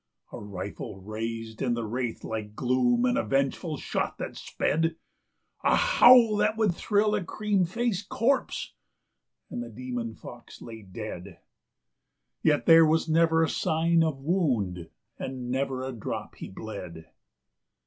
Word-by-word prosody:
"A -, -, -7 dB
rifle 100 Hz, -1 st, -7 dB
raised 110 Hz, +2 st, -5 dB
in 120 Hz, -2 st, +1 dB
the 115 Hz, -1 st, -3 dB
wraith 120 Hz, +1 st, -3 dB
like 105 Hz, -1 st, -5 dB
gloom, 185 Hz, -, +2 dB
and 255 Hz, +2 st, +2 dB
a -, -, 0 dB
vengeful 140 Hz, +4 st, -1 dB
shot -, -, -3 dB
that -, -, -5 dB
sped; 165 Hz, +2 st, -1 dB, 0.7 s
A -, -, +4 dB
howl 245 Hz, -, +6 dB
that 215 Hz, +1 st, +1 dB
would 215 Hz, -5 st, +2 dB
thrill 210 Hz, +3 st, +1 dB
a 210 Hz, -3 st, 0 dB
cream 205 Hz, 0 st, 0 dB
faced 205 Hz, +1 st, -2 dB
corpse 265 Hz, +5 st, 0 dB, 0.8 s
and -, -, -4 dB
the 120 Hz, -, -6 dB
demon 120 Hz, -1 st, -5 dB
fox 120 Hz, -1 st, -12 dB
lay 115 Hz, -1 st, -9 dB
dead.... 100 Hz, -2 st, -8 dB, 1.0 s
Yet 150 Hz, -2 st, +2 dB
there 165 Hz, 0 st, +8 dB
was 160 Hz, +2 st, +2 dB
never 165 Hz, 0 st, +3 dB
a -, -, +2 dB
sign 165 Hz, +1 st, +2 dB
of 155 Hz, -4 st, -1 dB
wound, 125 Hz, -, -1 dB, 0.3 s
and 125 Hz, -2 st, -5 dB
never 130 Hz, 0 st, -1 dB
a 130 Hz, -, -3 dB
drop 115 Hz, -4 st, -5 dB
he -, -, -9 dB
bled. 90 Hz, -5 st, -8 dB
135 Hz, 145 wpm, -27 LUFS, 115-185 Hz, 1.0 s, there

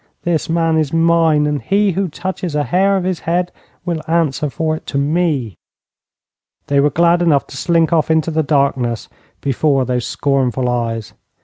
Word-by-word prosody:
This 170 Hz, -2 st, -1 dB
man 165 Hz, -1 st, +1 dB
is 150 Hz, -3 st, -1 dB
mine, 165 Hz, -2 st, +3 dB
and 150 Hz, -1 st, -1 dB
he 200 Hz, 0 st, +1 dB
who 190 Hz, +2 st, -1 dB
touches 180 Hz, 0 st, -5 dB
a 150 Hz, -, +1 dB
hair 195 Hz, +5 st, +2 dB
of 190 Hz, -, -2 dB
his 185 Hz, -2 st, -2 dB
head 175 Hz, +2 st, -1 dB, 0.3 s
will 170 Hz, -3 st, -2 dB
answer 160 Hz, -3 st, 0 dB
for 155 Hz, +2 st, -1 dB
it -, -, -11 dB
to 140 Hz, -, -3 dB
me.' 145 Hz, -, 0 dB, 1.1 s
They 140 Hz, 0 st, +1 dB
were 145 Hz, +1 st, +4 dB
glad 170 Hz, +2 st, +3 dB
enough 155 Hz, -5 st, +2 dB
to -, -, -12 dB
slink 170 Hz, 0 st, +1 dB
off 160 Hz, -1 st, +2 dB
into 160 Hz, 0 st, +1 dB
the 160 Hz, 0 st, +1 dB
darkness 140 Hz, -6 st, 0 dB, 0.3 s
before 135 Hz, 0 st, +1 dB
those 125 Hz, -1 st, -2 dB
scornful 130 Hz, -3 st, 0 dB
eyes. 115 Hz, -3 st, -3 dB
155 Hz, 175 wpm, -17 LUFS, 140-170 Hz, 1.1 s, were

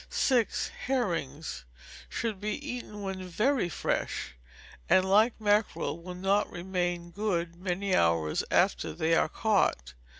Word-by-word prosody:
6. 245 Hz, -5 st, +1 dB, 0.2 s
Herrings 165 Hz, -, -2 dB, 0.5 s
should 220 Hz, -4 st, -3 dB
be 210 Hz, 0 st, -1 dB
eaten 240 Hz, -5 st, -6 dB
when 190 Hz, -1 st, -4 dB
very 215 Hz, +3 st, +1 dB
fresh; -, -, -2 dB, 0.6 s
and, 185 Hz, 0 st, +5 dB
like 215 Hz, +5 st, +4 dB
mackerel, 205 Hz, -6 st, +1 dB
will 180 Hz, +1 st, -7 dB
not 195 Hz, +3 st, +1 dB
remain 175 Hz, -1 st, -2 dB
good 175 Hz, -4 st, -1 dB
many 185 Hz, +2 st, -2 dB
hours 85 Hz, -2 st, +2 dB
after -, -, +2 dB
they 160 Hz, -, +1 dB
are 165 Hz, -, +3 dB
caught. 165 Hz, -, +1 dB
185 Hz, 125 wpm, -29 LUFS, 170-210 Hz, 0.6 s, and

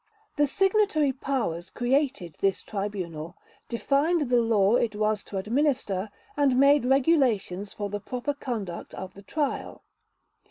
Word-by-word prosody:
The 290 Hz, -1 st, +3 dB
Signatory 385 Hz, -4 st, +2 dB
Powers 235 Hz, -11 st, -2 dB
created 250 Hz, -, 0 dB
this 195 Hz, -1 st, +1 dB
Tribunal, 180 Hz, -6 st, -5 dB, 0.3 s
defined 285 Hz, +5 st, +1 dB
the 245 Hz, -1 st, +5 dB
law 215 Hz, -3 st, +3 dB
it 225 Hz, -3 st, +1 dB
was 215 Hz, 0 st, 0 dB
to 200 Hz, -, -6 dB
administer, 215 Hz, -3 st, 0 dB, 0.3 s
and 275 Hz, -3 st, +3 dB
made 280 Hz, -1 st, +5 dB
regulations 250 Hz, -, +2 dB
for 205 Hz, -, -4 dB
the 205 Hz, +1 st, -4 dB
proper 250 Hz, +6 st, -3 dB
conduct 220 Hz, -11 st, -5 dB
of 190 Hz, -, -7 dB
the 200 Hz, -, -12 dB
Trial. 285 Hz, +7 st, -3 dB
240 Hz, 130 wpm, -27 LUFS, 200-280 Hz, 0.3 s, the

